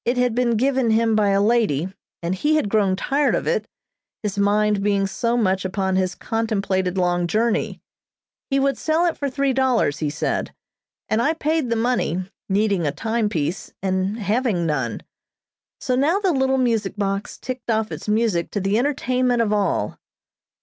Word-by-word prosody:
It 245 +2 0
had 250 -2 +2
been 240 -1 +1
given 260 0 +2
him 225 0 +3
by 210 -2 +3
a 195 0 +3
lady, 200 -6 +1 0.3
and 170 +2 0
he 295 +12 +1
had 305 -10 +1
grown 200 -4 +3
tired 275 +9 +1
of - - -2
it, - - 0 0.6
his 205 -2 -2
mind 205 0 +2
being 200 -1 +1
so 230 +4 -1
much 190 -4 +1
upon 190 0 -1
his 185 -1 0
contemplated 195 -5 -1
long 175 -1 +1
journey. 220 +5 0 0.7
He 275 -1 +2
would 275 -1 +1
sell 320 +2 +1
it 340 - +1
for 280 - -2
three 275 0 0
dollars, 255 - +1
he 150 - -1
said, 150 - -2 0.5
and 220 +1 +1
I 300 +7 +2
paid 315 -4 -1
the 230 - +1
money, 225 -7 0 0.3
needing 195 -4 +1
a - - +1
time 220 +7 -1
piece, 160 -1 -3
and 190 +2 0
having 210 -4 0
none. 135 -8 -1 0.8
So 255 - 0
now 295 +8 +2
the 395 -3 +1
little 265 -1 +2
music 225 -6 0
box 200 -1 -2
ticked 255 -2 -6
off 220 -1 0
its - - -7
music 210 -5 +1
to 205 - 0
the 195 +3 +1
entertainment 255 -3 +1
of 210 -2 0
all. 195 - 0
220 Hz, 175 wpm, -22 LUFS, 190-250 Hz, 0.8 s, him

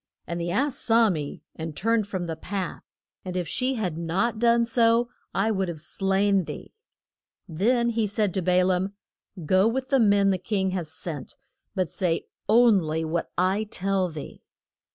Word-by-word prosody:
And 170 0 -4
the 170 - -2
ass 265 +9 +1
saw 225 -2 +4
me, 150 -4 -5
and 160 -2 -6
turned 225 -1 +1
from 185 -3 -3
the 165 -1 -4
path, 185 +2 -4 0.4
and 185 -1 -4
if 175 -2 -2
she 260 +9 0
had 180 -8 -2
not 190 +8 -1
done 235 0 +4
so 235 0 +3 0.2
I 210 +3 +1
would 190 -3 0
have 170 -3 -5
slain 195 +3 +1
thee. - - -8 0.7
Then 235 +8 +1
he 225 -2 0
said 205 -2 0
to 190 - 0
Ba 180 +1 +3
laam, 190 +1 0 0.5
Go 185 +5 +4
with 260 +3 -2
the 270 - +3
men 200 -3 +4
the 185 - 0
king 190 0 -1
has 175 -4 -3
sent, 160 -3 -6 0.4
but 185 -2 +1
say 165 +1 -1 0.2
on 225 -1 +6
ly 160 -1 -2
what 165 +1 -2
I 185 +3 +2
shall 215 - -2
tell 195 -1 0
thee. 155 -3 -9
190 Hz, 180 wpm, -25 LUFS, 175-225 Hz, 0.7 s, on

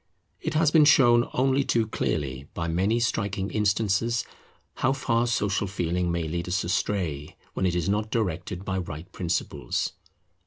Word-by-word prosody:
It 160 -1 -3
has 155 -1 +4
been 155 -1 +6
shown 120 -5 +5
only 135 +1 +2
too 115 -4 +1
clearly 70 -10 -2
by 85 - -2
many 95 +8 +1
striking 100 -4 -1
instances 105 +2 +1 0.5
how 130 +1 +2
far 120 -3 +1
Social 105 -3 0
Feeling 90 -1 -1
may 85 -1 -1
lead 85 +2 -3
us 90 +1 0
astray 85 -5 -2 0.2
when 95 - 0
it 90 - 0
is 85 -2 0
not 105 +2 0
directed 95 -4 -2
by 95 -1 -1
right 85 0 -7
principles. 80 -5 -2
100 Hz, 155 wpm, -26 LUFS, 85-115 Hz, 0.5 s, been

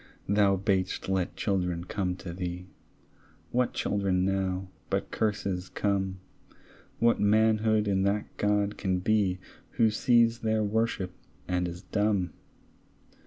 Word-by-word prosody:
Thou 100 -1 +3
bad'st 95 -1 -1
let 95 -2 0
children 90 -4 -1
come 90 -1 -2
to 90 -1 -7
thee; 90 0 -4 0.9
What 125 0 +1
children 95 -2 0
now 95 -1 -1 0.2
but - - -1
curses 100 -4 -1
come? 95 0 -1 0.8
What 115 0 +3
manhood 110 0 +3
in 95 -1 +2
that 100 +2 -1
God 105 0 +1
can 95 -2 0
be 95 -1 +1 0.4
Who 110 -1 +3
sees 115 +1 +3
their 110 -1 +1
worship, 105 -3 0 0.4
and 90 -1 0
is 85 +2 -7
dumb? 100 -1 0
100 Hz, 120 wpm, -28 LUFS, 90-105 Hz, 0.9 s, Thou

